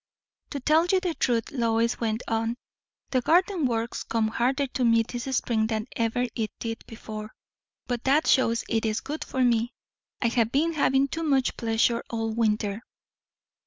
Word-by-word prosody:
"To 285 Hz, -, -4 dB
tell 310 Hz, +5 st, +3 dB
the 365 Hz, -2 st, +1 dB
truth," 230 Hz, -3 st, +1 dB
Lois 230 Hz, -2 st, +1 dB
went 225 Hz, 0 st, -1 dB
on, 225 Hz, +1 st, -1 dB, 0.5 s
"the 255 Hz, -, +2 dB
garden 350 Hz, +2 st, +3 dB
work 230 Hz, 0 st, -2 dB
comes 220 Hz, -1 st, +1 dB
harder 260 Hz, +5 st, +1 dB
to 255 Hz, -1 st, -3 dB
me 230 Hz, -1 st, +4 dB
this 240 Hz, +1 st, -6 dB
spring 220 Hz, -2 st, +1 dB
than 220 Hz, -1 st, -2 dB
ever 230 Hz, +2 st, 0 dB
it 220 Hz, -2 st, -2 dB
did 225 Hz, -1 st, -5 dB
before; 215 Hz, -1 st, -8 dB, 0.5 s
but 245 Hz, -2 st, -3 dB
that 285 Hz, +4 st, +4 dB
shows 230 Hz, -3 st, +3 dB
it 225 Hz, -1 st, 0 dB
is 220 Hz, -1 st, 0 dB
good 300 Hz, +2 st, -5 dB
for 260 Hz, -, -1 dB
me. 235 Hz, 0 st, +2 dB, 0.5 s
I 235 Hz, -, +2 dB
have 230 Hz, -1 st, +1 dB
been 325 Hz, +4 st, +2 dB
having 275 Hz, -2 st, +3 dB
too 325 Hz, +4 st, -4 dB
much 275 Hz, -5 st, +1 dB
pleasure 230 Hz, +1 st, +1 dB
all 225 Hz, -1 st, -2 dB
winter." 215 Hz, -2 st, 0 dB
235 Hz, 165 wpm, -26 LUFS, 225-270 Hz, 0.5 s, me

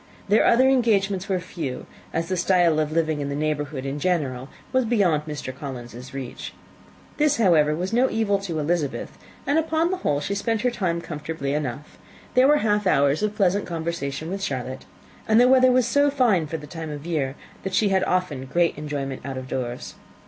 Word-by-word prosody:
Their 210 Hz, -, +5 dB
other 255 Hz, +3 st, +5 dB
engagements 205 Hz, -7 st, +2 dB
were 190 Hz, -1 st, +1 dB
few, 165 Hz, -7 st, -5 dB, 0.3 s
as 165 Hz, 0 st, -2 dB
the 185 Hz, -, -1 dB
style 175 Hz, -3 st, +3 dB
of 155 Hz, -1 st, 0 dB
living 155 Hz, -2 st, 0 dB
of 140 Hz, -, -3 dB
the 140 Hz, -, -3 dB
neighbourhood 150 Hz, -2 st, -2 dB
in 140 Hz, +2 st, -3 dB
general 140 Hz, -7 st, -1 dB, 0.2 s
was 260 Hz, 0 st, +3 dB
beyond 200 Hz, -10 st, +2 dB
the 145 Hz, -3 st, -5 dB
Collinses' 125 Hz, -2 st, -8 dB
reach. 135 Hz, -3 st, -7 dB, 0.6 s
This, 300 Hz, -1 st, +3 dB
however, 160 Hz, -8 st, +4 dB
was 180 Hz, +6 st, -3 dB
no 250 Hz, +3 st, +3 dB
evil 210 Hz, -3 st, +1 dB
to 180 Hz, -5 st, -4 dB
Elizabeth, 155 Hz, -1 st, -2 dB, 0.3 s
and 290 Hz, +3 st, +2 dB
upon 320 Hz, +2 st, +1 dB
the 375 Hz, -, -1 dB
whole 145 Hz, -, 0 dB
she 195 Hz, -, -3 dB
spent 220 Hz, +2 st, -1 dB
her 250 Hz, 0 st, +1 dB
time 175 Hz, -7 st, -1 dB
comfortably 150 Hz, -3 st, -4 dB
enough: 145 Hz, -1 st, -4 dB, 0.3 s
there 255 Hz, +1 st, +5 dB
were 295 Hz, +1 st, +5 dB
half 210 Hz, -2 st, +2 dB
hours 140 Hz, -1 st, +3 dB
of 210 Hz, 0 st, -1 dB
pleasant 200 Hz, 0 st, +1 dB
conversation 165 Hz, -2 st, -4 dB
with 195 Hz, 0 st, -4 dB
Charlotte, 130 Hz, -5 st, -4 dB, 0.4 s
and 220 Hz, +1 st, +5 dB
the 245 Hz, -, +6 dB
weather 255 Hz, 0 st, +6 dB
was 250 Hz, -1 st, +3 dB
so 285 Hz, +3 st, +3 dB
fine 235 Hz, -, +2 dB
for 160 Hz, -, -3 dB
the 150 Hz, -, -10 dB
time 160 Hz, +1 st, -7 dB
of 145 Hz, 0 st, -7 dB
year, 145 Hz, -6 st, -1 dB, 0.3 s
that 190 Hz, -1 st, -3 dB
she 205 Hz, 0 st, +3 dB
had 190 Hz, -1 st, +2 dB
often 180 Hz, -8 st, -1 dB
great 170 Hz, +5 st, +1 dB
enjoyment 140 Hz, -3 st, -4 dB
out 135 Hz, 0 st, -5 dB
of 130 Hz, 0 st, -6 dB
doors. 125 Hz, -2 st, -4 dB
170 Hz, 195 wpm, -24 LUFS, 145-210 Hz, 0.6 s, the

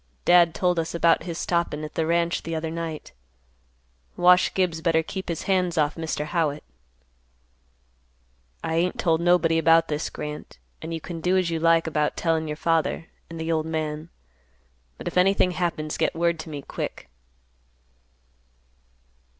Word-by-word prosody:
"Dad 175 Hz, -2 st, +5 dB
told 180 Hz, -2 st, +1 dB
us 165 Hz, +1 st, -3 dB
about 165 Hz, -1 st, +3 dB
his 170 Hz, -2 st, -5 dB
stoppin' 170 Hz, -4 st, -1 dB
at 150 Hz, -, -7 dB
the 160 Hz, -, -1 dB
ranch 170 Hz, +1 st, +1 dB
the 165 Hz, 0 st, -4 dB
other 160 Hz, 0 st, -3 dB
night. 165 Hz, -2 st, -5 dB, 1.1 s
Wash 180 Hz, +1 st, +5 dB
Gibbs 175 Hz, -4 st, 0 dB
better 160 Hz, -1 st, +2 dB
keep 190 Hz, +2 st, -6 dB
his 170 Hz, -, -3 dB
hands 180 Hz, -3 st, +1 dB
off 150 Hz, -1 st, +2 dB
Mr. 160 Hz, -2 st, -3 dB
Howitt." 155 Hz, -2 st, -1 dB, 2.0 s
"I 160 Hz, -, -1 dB
ain't 180 Hz, +2 st, 0 dB
told 165 Hz, -2 st, +2 dB
nobody 170 Hz, -2 st, +3 dB
about 165 Hz, 0 st, +4 dB
this, 150 Hz, 0 st, -2 dB
Grant, 150 Hz, 0 st, -7 dB, 0.2 s
and 160 Hz, -, -6 dB
you 165 Hz, -, -3 dB
can 165 Hz, +1 st, -7 dB
do 180 Hz, +3 st, +2 dB
as 180 Hz, -2 st, +1 dB
you 165 Hz, -, -1 dB
like 165 Hz, 0 st, +3 dB
about 150 Hz, -2 st, -1 dB
tellin' 160 Hz, -2 st, 0 dB
your 150 Hz, 0 st, -4 dB
father, 165 Hz, 0 st, 0 dB, 0.2 s
and 165 Hz, -1 st, -8 dB
the 160 Hz, +1 st, -2 dB
old 160 Hz, -1 st, 0 dB
man. 155 Hz, 0 st, -3 dB, 0.9 s
But -, -, -8 dB
if -, -, -3 dB
anything 185 Hz, 0 st, +3 dB
happens, 170 Hz, -4 st, -2 dB
get -, -, +1 dB
word 170 Hz, 0 st, +1 dB
to 160 Hz, -, -7 dB
me, 145 Hz, -2 st, -6 dB
quick." -, -, -6 dB
165 Hz, 160 wpm, -25 LUFS, 160-170 Hz, 2.0 s, Dad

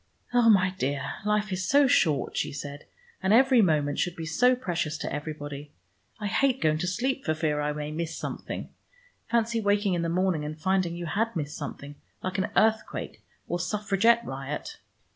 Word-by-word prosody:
"Oh, 240 Hz, -2 st, +5 dB
my 190 Hz, -3 st, +5 dB
dear, 140 Hz, +1 st, -2 dB
life 210 Hz, -1 st, +1 dB
is 185 Hz, 0 st, -2 dB
so 285 Hz, +1 st, +5 dB
short," 155 Hz, -, +2 dB
she -, -, -1 dB
said, 145 Hz, 0 st, -7 dB, 0.4 s
"and 190 Hz, -, +1 dB
every 255 Hz, +1 st, +6 dB
moment 150 Hz, -6 st, +2 dB
should 175 Hz, -1 st, 0 dB
be 165 Hz, -, -5 dB
so 245 Hz, +11 st, +3 dB
precious 170 Hz, -, -2 dB
to -, -, -4 dB
everybody. 145 Hz, -1 st, -6 dB, 0.5 s
I 210 Hz, -, -4 dB
hate 265 Hz, +5 st, +2 dB
going 155 Hz, 0 st, +2 dB
to 180 Hz, -, -1 dB
sleep, 255 Hz, +8 st, -1 dB
for 155 Hz, -, 0 dB
fear 150 Hz, -2 st, 0 dB
I 150 Hz, 0 st, 0 dB
may 150 Hz, 0 st, -4 dB
miss 165 Hz, +1 st, -4 dB
something. -, -, -5 dB, 0.6 s
Fancy 230 Hz, 0 st, +1 dB
waking 205 Hz, -1 st, +2 dB
in 175 Hz, -, 0 dB
the 170 Hz, -, -1 dB
morning 180 Hz, -2 st, +1 dB
and 150 Hz, +1 st, -5 dB
finding 185 Hz, 0 st, +1 dB
you 175 Hz, 0 st, -5 dB
had 225 Hz, +6 st, -1 dB
missed 150 Hz, -2 st, -3 dB
something, 145 Hz, -1 st, -7 dB, 0.3 s
like 185 Hz, +1 st, -2 dB
an 190 Hz, -, 0 dB
earthquake 220 Hz, 0 st, +1 dB, 0.3 s
or 175 Hz, -, -2 dB
suffragette 210 Hz, +5 st, +2 dB
riot! 135 Hz, +2 st, -5 dB
180 Hz, 180 wpm, -27 LUFS, 150-215 Hz, 0.6 s, every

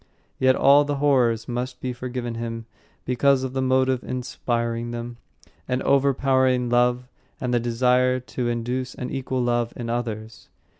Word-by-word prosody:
Yet 130 Hz, 0 st, +4 dB
all 140 Hz, +2 st, +6 dB
the 145 Hz, 0 st, -2 dB
horrors 125 Hz, -6 st, +2 dB
must 125 Hz, +1 st, -4 dB
be 125 Hz, -1 st, -3 dB
forgiven 120 Hz, -1 st, -5 dB
him 115 Hz, 0 st, -5 dB, 0.4 s
because 130 Hz, +2 st, +2 dB
of 130 Hz, -1 st, -4 dB
the 135 Hz, -, -1 dB
motive 130 Hz, -1 st, +2 dB
inspiring 120 Hz, -2 st, -3 dB
them 120 Hz, 0 st, -6 dB, 0.5 s
an 125 Hz, 0 st, -1 dB
overpowering 130 Hz, -2 st, +2 dB
love 125 Hz, +1 st, +2 dB, 0.3 s
and 125 Hz, -1 st, -2 dB
the 120 Hz, -, +3 dB
desire 125 Hz, +2 st, +2 dB
to 125 Hz, -1 st, -4 dB
induce 125 Hz, +2 st, -3 dB
an 125 Hz, -, -5 dB
equal 130 Hz, -1 st, -2 dB
love 120 Hz, -1 st, 0 dB
in 120 Hz, -1 st, -4 dB
others. 110 Hz, -3 st, -5 dB
125 Hz, 150 wpm, -24 LUFS, 120-130 Hz, 0.5 s, all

